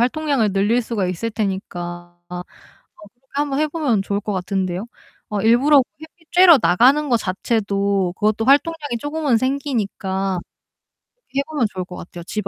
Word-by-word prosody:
활동량을 255 -4 +1
늘릴 205 +5 +2
수가 220 -5 -2
있을 185 +6 -3
테니까 175 -5 -4
아 180 0 -5 0.5
그렇게 245 +5 -19
한번 285 -1 -1
해 310 - +3
보면 290 -10 0
좋을 200 +1 -2
것 210 0 -4
같은데요. 185 +1 -2 0.4
어 210 -1 -2
일부러 260 +7 +5 0.2
햇빛 320 +1 -16
쬐러 350 -4 +7
나가는 260 +11 +4
거 245 - +3
자체도 200 -2 -1
그것도 215 +1 +1
활동량이 290 -1 +2
쪼금은 290 -4 0
생기니까 205 -8 -2 0.8
그렇게 485 - -6
해 - - +1
보면 290 -8 0
좋을 185 -1 -4
것 180 - -10
같아요. 175 0 -9
집 210 +3 -4
220 Hz, 340 characters per minute, -20 LUFS, 195-280 Hz, 0.8 s, 쬐러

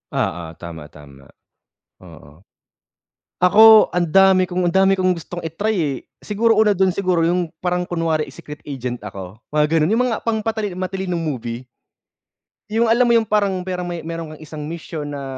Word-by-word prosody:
Oo, 85 +1 -1
tama, 80 -3 -9
tama, 70 -2 -16 0.7
oo. 80 -1 -16 0.9
Ako 215 +4 +7
ang 175 -2 0
dami 190 +1 +4
kong 180 0 -1
ang 170 - 0
dami 195 0 +4
kong 185 0 +2
gustong 175 0 -8
i-try, 200 +7 -2
eh. 145 -6 -1 0.2
Siguro, 225 +1 +1
una 215 -1 +4
dun 190 0 +2
siguro, 180 -2 0
yung 175 0 0
parang 180 0 -1
kunwari, 165 -3 -1
eh, 140 - -13
secret 150 0 -11
agent 125 -3 -5
ako, 95 -1 -8 0.2
mga 150 0 +3
ganun? 160 +7 +2
Yung 245 - +2
mga 230 - -4
pang 220 -1 0
patali 220 -3 -3
matalinong 185 -1 -3
movie? 125 -5 -5 1.0
Yung 230 +2 +2
alam 235 +3 +4
mo 240 - +2
yung 230 -2 +3
parang, 200 -3 +1
pero 180 -1 -3
may 175 -1 -5
meron 165 -2 -6
kang 155 - -11
isang 150 -1 -7
misyon 160 -3 -6
na 140 -1 -6
175 Hz, 175 wpm, -20 LUFS, 145-195 Hz, 1.0 s, Ako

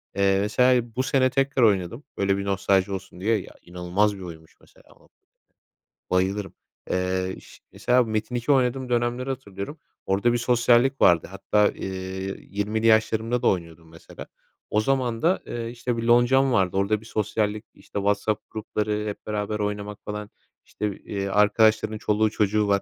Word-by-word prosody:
Eee, 100 -1 +3
mesela 120 +2 +2
bu 130 - 0
sene 130 -1 +2
tekrar 135 -1 +1
oynadım, 105 +5 +1
böyle, 100 0 +1
bir 100 - -4
nostalji 100 0 +1
olsun 95 -1 -7
diye. 110 +2 +2
Ya - - -13
inanılmaz 90 +4 0
bir - - -10
oyunmuş 80 -3 -10
mesela - - -22
o, - - -25 1.0
bayılırım. 95 +2 0 0.4
Eee, 95 0 0
iş - - -15
mesela 125 +1 +1
Metin2 120 +3 0
oynadığım 130 -1 +1
dönemleri 120 +2 -1
hatırlıyorum. 115 - -6 0.3
Orada 100 +5 +2
bir 120 - +1
sosyallik 120 +2 +3
vardı 85 -2 +4
hatta, 105 +1 +2
eee, - - -7 0.6
20'li 105 +3 -1
yaşlarımda 110 +2 +2
da - - 0
oynuyordum 85 -2 -3
mesela. 80 - -12 0.4
O 105 - +2
zaman 125 -2 0
da, 180 +4 +2
eee, 115 -1 -4
işte, 120 0 -3
bir 115 - -3
loncam 120 +3 +4
vardı. 95 -3 +1
Orada 100 +2 +1
bir 110 - -15
sosyallik, 105 0 -1
işte, - - -7
WhatsApp 100 +1 -1
grupları 105 -1 -2
hep 105 - -7
beraber 105 0 -2
oynamak 105 0 -3
falan. 105 0 -6 0.3
İşte, 105 -2 -4
eee, 100 -1 -4
arkadaşların 110 +2 +3
çoluğu 105 +1 +1
çocuğu 105 0 +1
var. 100 -1 +3
105 Hz, 160 wpm, -24 LUFS, 100-120 Hz, 1.0 s, vardı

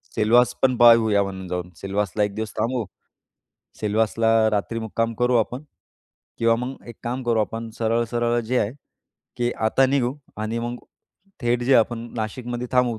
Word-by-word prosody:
Selvas 120 +3 +4
पण 130 -1 +3
पाहूया 115 -4 +6
म्हणून 95 -1 -6
जाऊन 90 0 -4
सिलवासला 100 +1 -1
1 105 -1 -2
दिवस 110 0 -4
थांबू. 115 +1 -1 0.9
सिलवासला 110 +1 +2
रात्री 105 +2 -1
मुक्काम 115 +1 -2
करू 125 0 +3
आपण. 125 +5 -1 0.8
किंवा 115 0 +4
मग 125 +3 -5
एक 120 - -9
काम 125 +2 -3
करू 115 -2 +1
आपण, 115 +1 -4
सरळ-सरळ 120 +1 +1
जे 125 +3 -1
आहे 105 - 0 0.7
की 120 0 +1 0.2
आता 130 +4 +3
निघू 130 -1 +1 0.3
आणि 115 +2 -2
मग 120 +1 -3 0.7
थेट 120 0 +1
जे 135 +1 +4
आपण 115 +1 0
नाशिकमध्ये 120 +3 -4
थांबू." 125 -3 +2
115 Hz, 155 wpm, -23 LUFS, 110-120 Hz, 0.9 s, पाहूया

